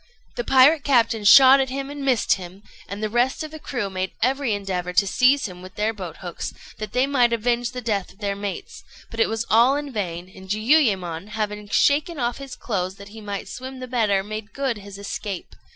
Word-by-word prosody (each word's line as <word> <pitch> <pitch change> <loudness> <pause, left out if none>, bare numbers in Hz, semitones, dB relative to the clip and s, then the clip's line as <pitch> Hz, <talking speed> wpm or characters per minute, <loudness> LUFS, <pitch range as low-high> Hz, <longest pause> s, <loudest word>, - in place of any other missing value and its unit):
The - - -2
pirate 280 - +5
captain 230 -5 +2
shot 270 +4 +9
at 265 -1 0
him 275 +1 -4
and 290 -1 -6
missed 255 -5 +2
him, 185 +1 -8 0.2
and 200 +2 -6
the - - +1
rest 245 +7 +1
of 310 - -7
the 315 - -9
crew 245 -8 -3
made 185 -1 -4
every 265 0 +1
endeavour 185 -3 -3
to 200 - +4
seize 255 +7 +3
him 180 -2 -11
with 185 0 -12
their 215 +2 0
boat 180 -6 -8
hooks, 175 -2 -6 0.2
that 215 -1 -5
they 255 +1 +3
might 250 -4 +2
avenge 240 +1 0
the 250 0 -6
death 205 -6 -2
of 195 - -22
their 200 -1 -2
mates; 200 -1 -6 0.3
but 230 - -7
it 225 - +3
was 225 +1 -2
all 235 +5 +5
in 290 -2 -4
vain, 180 -4 -4
and 190 0 -13
Jiuyémon, 205 - +1
having 210 -1 -4
shaken 300 - +2
off 240 -1 -2
his 275 -2 -8
clothes 190 -4 -3
that 200 0 -12
he 220 +1 -11
might 200 -2 -5
swim 260 +5 -8
the 255 - -6
better, 215 -6 +1
made 215 +1 -7
good 265 -6 -2
his 200 -1 -11
escape. 200 -1 -6
220 Hz, 215 wpm, -23 LUFS, 200-260 Hz, 0.3 s, shot